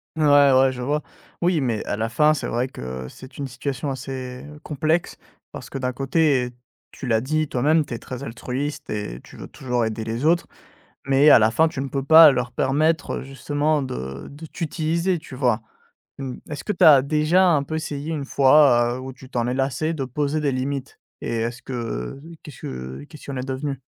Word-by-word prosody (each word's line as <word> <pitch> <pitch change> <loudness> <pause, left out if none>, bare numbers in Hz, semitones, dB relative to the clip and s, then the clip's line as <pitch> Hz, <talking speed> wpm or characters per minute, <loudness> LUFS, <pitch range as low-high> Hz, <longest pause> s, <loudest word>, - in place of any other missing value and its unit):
Ouais, 155 - +1 0.3
ouais, 130 0 +5
je 125 -1 -7
vois. 145 +4 -1 0.4
Oui 175 -4 +2
mais 115 -5 -1
à - - -2
la 110 +2 -2
fin, 150 +6 +4
c'est 150 - -3
vrai 120 +3 -1
que 65 - -7
c'est 130 - -13
une 140 - -3
situation 135 +2 -4
assez, 130 0 -6
heu, 150 0 -12
complexe 155 +3 -1 0.3
parce - - -9
que, - - -5
d'un 125 -1 -2
côté 135 0 +2
et 125 - -6 0.4
tu 135 - -9
l'as 110 -2 +2
dit 155 +4 0
toi-même, 150 +5 +2
tu 120 - -7
es 115 - -5
très 130 +1 -7
altruiste 140 +4 -5
et 105 - -4
tu - - -14
veux - - -8
toujours 125 -4 -2
aider 110 0 -3
les 115 +5 -3
autres, 170 +2 +3 0.6
mais 140 +2 +5
à - - +9
la 110 +1 +3
fin, 160 +7 +3
tu 160 -5 -4
ne 135 - -3
peux 135 +1 -2
pas 160 +1 +9
leur 125 -2 -2
permettre 155 +5 +1
justement 145 +2 -1
de 70 - -6
de 145 +3 -10
t'utiliser, 165 +2 -1
tu 135 - -11
vois? 125 -4 +1 0.6
Mmh, 130 -2 -5 0.2
est-ce 150 - -5
que 210 - -1
tu - - +3
as 145 -4 +9
déjà, 155 +6 +3
un 150 -5 +3
peu, 155 +3 -4
essayé 155 0 -4
une 145 -3 -3
fois, 130 -4 +5
heu, - - -6
où 130 0 -7
tu 130 -1 -15
t'en 120 -1 -1
ai 125 - -1
lassé, 135 +4 -1
de 140 -4 -3
poser 145 +4 -1
des 140 -2 0
limites 135 +1 -4 0.2
et 115 - -2
est-ce 120 +2 -3
que - - -8
heu, 115 - -4 0.2
qu'est-ce 150 - -12
que 65 +2 -7
qu'est-ce 155 - -13
qu'il 140 - -6
en 135 - -4
est 130 +1 -5
devenu? 135 0 -3
135 Hz, 215 wpm, -23 LUFS, 125-150 Hz, 0.6 s, à